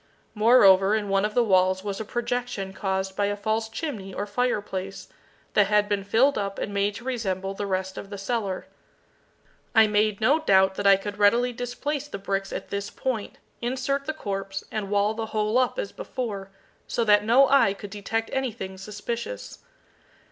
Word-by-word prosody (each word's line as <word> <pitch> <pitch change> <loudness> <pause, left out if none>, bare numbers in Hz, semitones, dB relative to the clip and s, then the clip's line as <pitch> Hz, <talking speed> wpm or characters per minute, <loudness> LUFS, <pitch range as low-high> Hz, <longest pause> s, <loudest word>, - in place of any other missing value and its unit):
Moreover, 210 -3 +6
in 210 -2 -2
one 195 +1 +2
of 210 - -3
the 245 - +4
walls 185 -2 +3
was 200 -1 -4
a - - -2
projection 240 -4 -3
caused 190 0 -2
by 205 0 +1
a 205 - -1
false 220 +2 -1
chimney 225 - -5
or 205 - -2
fireplace, 205 -4 -2 0.5
that 205 -2 +4
had 210 0 +3
been 205 -1 -1
filled 230 +6 +3
up 200 -1 -3
and 205 - -4
made 200 +1 0
to 230 - -8
resemble 195 -7 -2
the 200 +1 -4
rest 190 0 -2
of 195 - -9
the 200 - -6
cellar. 195 -2 -2 1.1
I 220 0 +8
made 210 -1 +1
no 275 +8 +3
doubt 190 -9 +4
that 200 +1 -1
I 195 - +8
could 205 +1 -6
readily 235 +4 +4
displace 260 +4 -3
the 245 - -6
bricks 195 0 -3
at - - -5
this 200 0 -3
point, 240 -6 -4 0.2
insert 265 +3 -1
the 310 - -1
corpse, 195 -7 -4
and 210 -3 -3
wall 205 +1 +2
the 220 0 -4
whole 215 +2 +1
up 255 - +1
as - - -3
before, 230 - -5 0.4
so 235 - 0
that 210 -2 +5
no 250 +5 +5
eye 265 -8 +4
could 200 0 -9
detect 225 +2 -3
anything 225 -8 -3
suspicious. 215 - -6
210 Hz, 185 wpm, -25 LUFS, 195-240 Hz, 1.1 s, I